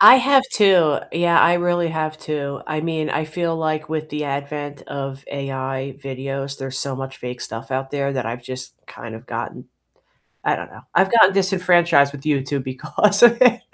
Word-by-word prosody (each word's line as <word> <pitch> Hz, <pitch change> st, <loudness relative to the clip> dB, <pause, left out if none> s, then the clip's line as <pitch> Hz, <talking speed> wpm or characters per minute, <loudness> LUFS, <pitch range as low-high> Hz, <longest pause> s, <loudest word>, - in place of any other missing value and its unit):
I 210 Hz, +5 st, +10 dB
have 265 Hz, +1 st, +4 dB
too, 180 Hz, -8 st, +5 dB
yeah, 170 Hz, 0 st, +3 dB
I 175 Hz, -, +5 dB
really 175 Hz, -1 st, +1 dB
have 155 Hz, -1 st, -3 dB
too, 140 Hz, -2 st, -4 dB
I 155 Hz, -1 st, -2 dB
mean, 160 Hz, -1 st, -2 dB
I 155 Hz, -, -1 dB
feel 165 Hz, +1 st, -2 dB
like 155 Hz, -1 st, -2 dB
with 155 Hz, -1 st, -4 dB
the 150 Hz, 0 st, -3 dB
advent 145 Hz, 0 st, -5 dB
of 135 Hz, -1 st, -6 dB
AI 135 Hz, -1 st, -4 dB
videos, 135 Hz, +1 st, -4 dB
there's 135 Hz, -1 st, -3 dB
so 140 Hz, -1 st, 0 dB
much 135 Hz, 0 st, -7 dB
fake 125 Hz, 0 st, -7 dB
stuff 115 Hz, +3 st, -6 dB
out 135 Hz, +1 st, -3 dB
there 140 Hz, -1 st, -2 dB
that 130 Hz, -3 st, -3 dB
I've 120 Hz, +1 st, -5 dB
just 130 Hz, 0 st, -5 dB
kind 115 Hz, -2 st, -9 dB
of 115 Hz, +3 st, -12 dB
gotten 115 Hz, 0 st, -6 dB, 0.8 s
I -, -, +2 dB
don't -, -, -8 dB
know, -, -, -13 dB
I've 190 Hz, +3 st, +3 dB
gotten 200 Hz, -4 st, +6 dB
disenfranchised 175 Hz, -6 st, +3 dB
with 140 Hz, -, -10 dB
YouTube 140 Hz, -2 st, -1 dB
because 200 Hz, -, +1 dB
of 235 Hz, +1 st, +7 dB
it. 240 Hz, -1 st, +5 dB
145 Hz, 190 wpm, -21 LUFS, 135-170 Hz, 0.8 s, I